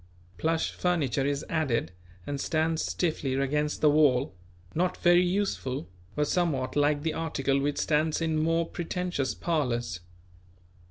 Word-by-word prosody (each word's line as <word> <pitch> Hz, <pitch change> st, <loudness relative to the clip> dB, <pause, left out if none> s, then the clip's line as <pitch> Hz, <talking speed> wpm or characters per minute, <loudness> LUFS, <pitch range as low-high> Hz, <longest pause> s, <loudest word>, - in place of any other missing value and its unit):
Plush 160 Hz, 0 st, 0 dB
furniture 145 Hz, -7 st, 0 dB
is 140 Hz, 0 st, -1 dB
added 135 Hz, -, 0 dB, 0.3 s
and 140 Hz, -1 st, -3 dB
stands 160 Hz, 0 st, 0 dB
stiffly 155 Hz, -6 st, -1 dB
against 150 Hz, +2 st, 0 dB
the 150 Hz, -, +6 dB
wall; 140 Hz, -6 st, +3 dB, 0.4 s
not 180 Hz, +2 st, 0 dB
very 175 Hz, 0 st, +5 dB
useful, 180 Hz, -, -1 dB, 0.3 s
but 150 Hz, 0 st, +1 dB
somewhat 150 Hz, -8 st, 0 dB
like 145 Hz, 0 st, +2 dB
the 160 Hz, -1 st, 0 dB
article 140 Hz, -4 st, 0 dB
which 145 Hz, +1 st, -1 dB
stands 155 Hz, 0 st, +1 dB
in 160 Hz, -1 st, 0 dB
more 165 Hz, +1 st, +1 dB
pretentious 175 Hz, -5 st, -2 dB
parlours. 125 Hz, -, -1 dB
150 Hz, 130 wpm, -28 LUFS, 140-165 Hz, 0.4 s, the